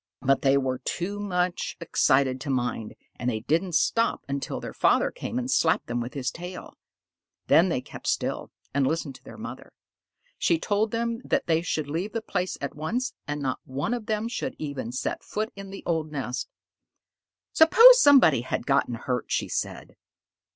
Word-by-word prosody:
but 135 +1 +2
they 135 0 +4
were 130 -2 -1
too 180 +10 -3
much 180 -3 -1
excited 130 -5 +2
to 140 - -5
mind, 125 -4 -2 0.2
and 125 - 0
they 110 -3 -2
did 155 +8 +2
not 180 -4 -5
stop 230 +6 +2
until 140 0 -3
their - - -7
father - - +3
came 250 - -5
and 255 +1 -2
slapped 160 -8 +2
them 120 0 -2
with 120 +4 -6
his 135 -1 -2
tail. 180 +2 -8 0.7
Then - - +5
they - - -1
kept - - -10
still - - -1 0.2
and 140 -1 +2
listened 160 -3 -2
to - - -29
their - - -11
mother. - - -9 0.7
She 170 - +3
told 205 +5 0
them 230 0 -2
that - - 0
they 165 -1 +2
should 155 -3 -2
leave 170 +8 -3
the 230 - -2
place 180 -3 -2
at 140 - -3
once, 230 - -2
and 145 0 -3
not 130 -1 -1
one 140 - -3
of 235 -3 -4
them 215 +1 -1
should 260 +2 -4
even 140 -6 -5
set 130 - -3
foot 215 +1 -3
in 195 -1 -9
the 195 - -9
old 160 -2 -1
nest. 130 -3 -4 1.0
"Suppose 475 +10 +8
somebody 260 - +6
had 120 - -3
gotten 135 -3 +1
hurt," 125 +1 -2
she - - 0
said. - - -4
160 Hz, 185 wpm, -26 LUFS, 135-210 Hz, 1.0 s, Suppose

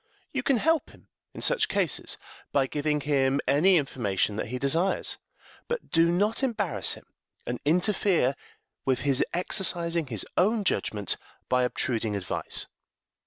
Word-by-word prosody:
You - - 0
can 275 - +2
help 320 +6 +1
him - - -20 0.3
in - - -7
such - - +3
cases - - -1 0.3
by 140 -2 +3
giving 150 +2 -1
him 140 -1 +2
any 165 +8 +5
information 110 - 0
that - - -2
he 125 +3 -3
desires, 165 +9 0 0.5
but 480 -1 -4
do 165 +1 +4
not 205 +7 +1
embarrass 210 - 0
him, - - -12 0.4
and 120 0 -3
interfere 180 - +2 0.5
with 130 -1 +1
his 140 -2 +2
exercising 170 -3 +1
his 110 -6 -2
own 210 +4 +3
judgment 105 - 0 0.3
by 125 0 +3
obtruding 115 -3 0
advice. 95 -2 -2
150 Hz, 140 wpm, -27 LUFS, 125-190 Hz, 0.5 s, any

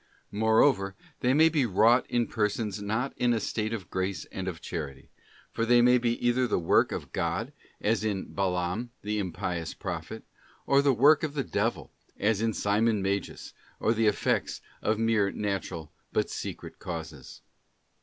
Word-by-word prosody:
Moreover, 110 -1 +3 0.2
they 125 - +2
may 155 +4 +6
be 155 -3 +2
wrought 115 +5 +4
in 120 -1 +1
persons 105 -1 -1
not 110 +6 -1
in 120 -1 +2
a 115 - +1
state 110 +1 -2
of 105 -6 -5
grace 95 +1 -2
and 95 0 -5
of 85 -3 -4
charity; 75 -7 -6 0.4
for 115 - -2
they 120 +1 +5
may 125 +1 +5
be 120 -1 +1
either 125 +1 +3
the - - +1
work 85 - +3
of - - -5
God, - - -2 0.3
as 110 -1 +1
in 100 -3 -3
Balaam 95 +4 -1
the 105 +1 -1
impious 85 -3 -3
prophet, - - -6 0.4
or 140 0 +4
the 140 -1 +4
work 140 +5 +5
of 150 -2 -3
the 140 - 0
devil, 100 - -2 0.3
as 105 +1 +1
in 115 0 +1
Simon 105 0 +1
Magus, 100 +1 -3 0.3
or 110 - +2
the 110 -1 +2
effects 105 - 0 0.2
of 110 - +1
mere 110 -3 +2
natural 95 -6 -4 0.2
but - - 0
secret - - -6
causes. 85 -2 -7
110 Hz, 165 wpm, -28 LUFS, 95-120 Hz, 0.4 s, may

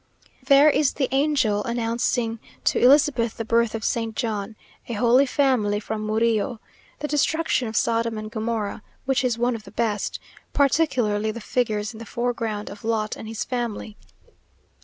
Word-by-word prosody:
There 275 +2 +6
is 295 -1 +3
the 265 - 0
Angel 270 -7 +2
announcing 235 0 -1 0.2
to - - +2
Elizabeth 260 -3 +4
the 225 - -3
birth 230 0 +2
of 220 - -5
Saint 225 0 -1
John; 215 -3 -3 0.3
a 235 - -4
Holy 245 +5 +4
Family, 250 -7 +2
from 215 0 -4
Murillo; 220 0 +1 0.4
the 295 - -4
destruction 295 -3 +1
of 220 - -6
Sodom 230 0 +1
and 215 0 -6
Gomorrah, 220 -2 -3 0.2
which 265 0 +1
is 245 -2 +1
one 240 +1 +1
of 225 - -7
the - - -12
best; 215 -3 -2 0.3
particularly 245 -7 +2
the 225 +2 -4
figures 215 -2 -1
in 220 - -11
the 230 - -9
foreground, 230 -3 -2
of 205 0 -11
Lot 220 -1 -1
and 220 - -9
his 220 -1 -3
family. 235 -4 -4
230 Hz, 160 wpm, -24 LUFS, 215-255 Hz, 0.4 s, There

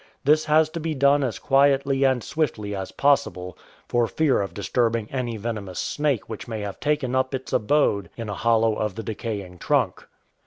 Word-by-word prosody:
This 155 +2 +4
has 155 +1 +4
to 165 - -5
be 160 -1 -2
done 140 +1 +4
as 120 -6 -2
quietly 135 0 +3
and 130 -3 +2
swiftly 120 -9 -2
as 95 -1 -5
possible, 90 -11 +1 0.3
for 120 -1 +1
fear 150 -2 +1
of 95 -4 -5
disturbing 115 +1 0
any 120 -4 -3
venomous 105 -4 -5
snake 145 -6 -1
which 110 +1 -7
may 110 -2 -4
have 100 -2 -6
taken 145 -4 0
up 130 +1 +1
its 130 0 -7
abode 105 - +2
in 115 -2 -5
a 105 - -3
hollow 115 +2 +2
of 105 -2 -2
the 115 - -5
decaying 100 -4 -5
trunk. - - 0
120 Hz, 185 wpm, -24 LUFS, 105-140 Hz, 0.3 s, This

